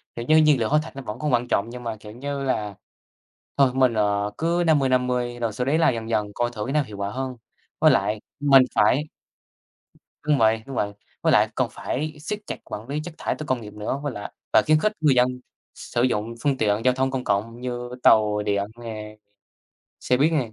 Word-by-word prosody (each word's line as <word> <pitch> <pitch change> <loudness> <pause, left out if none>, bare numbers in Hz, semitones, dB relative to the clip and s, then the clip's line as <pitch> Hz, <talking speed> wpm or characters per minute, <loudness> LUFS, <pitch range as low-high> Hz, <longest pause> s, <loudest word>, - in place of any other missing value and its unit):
Kiểu 120 - -5
như, 155 +4 +5
nhiên 150 -4 +5
liệu 110 - 0
hóa 150 - +4
thạch 160 - -11
nó 135 - -6
vẫn 105 -5 -7
còn 150 -3 -1
quan 120 0 +2
trọng 110 -1 0
nhưng 125 +1 -8
mà, 115 -1 -3
kiểu 105 0 -11
như 140 +3 -4
là, 105 -6 -2 0.8
thôi 135 -2 +5
mình, 130 -3 +3
ờ, 105 -1 0
cứ 170 +2 +1
50-50 125 -5 +1
rồi 115 -2 -1
sau 125 +4 -2
đấy 150 +4 +2
là 160 - +4
dần 115 -1 -4
dần 105 -2 0
coi 120 0 0
thử 105 -3 -5
cái 135 - -3
nào 150 0 +3
hiệu 105 -3 -10
quả 100 0 -2
hơn. 130 +1 -4 0.4
Với 155 - +6
lại 105 -3 +1 0.2
mình 135 -2 +7
phải 130 +8 +3 1.2
đúng 150 -2 +3
vậy, 110 -1 +3
đúng 135 - -7
vậy, 105 -2 -1 0.3
với - - +3
lại - - +5
cần - - 0
phải 155 +3 -4
siết 205 +7 -4
chặt - - -4
quản 110 +4 -7
lý 145 +2 -2
chất 175 -2 -8
thải - - -1
từ 155 - -6
công 130 -2 0
nghiệp 105 - -9
nữa, 105 +6 -3
với 145 -3 -2
lại 105 - -7 0.2
và - - +6
khuyến 155 0 +5
khích 215 - +1
người 150 -4 +4
dân 125 0 +4 0.5
sử 120 - -3
dụng 115 -2 0
phương 140 -2 +1
tiện 105 0 +1
giao 125 - +4
thông 130 +1 0
công 130 -1 -3
cộng 115 +4 -1
như 120 -1 -4
tàu 105 -1 +4
điện 100 -1 0 0.2
nè, 110 -2 -7 0.8
xe 125 - +2
buýt 150 +5 +3
nè. 125 -8 0
125 Hz, 230 wpm, -24 LUFS, 110-140 Hz, 1.2 s, mình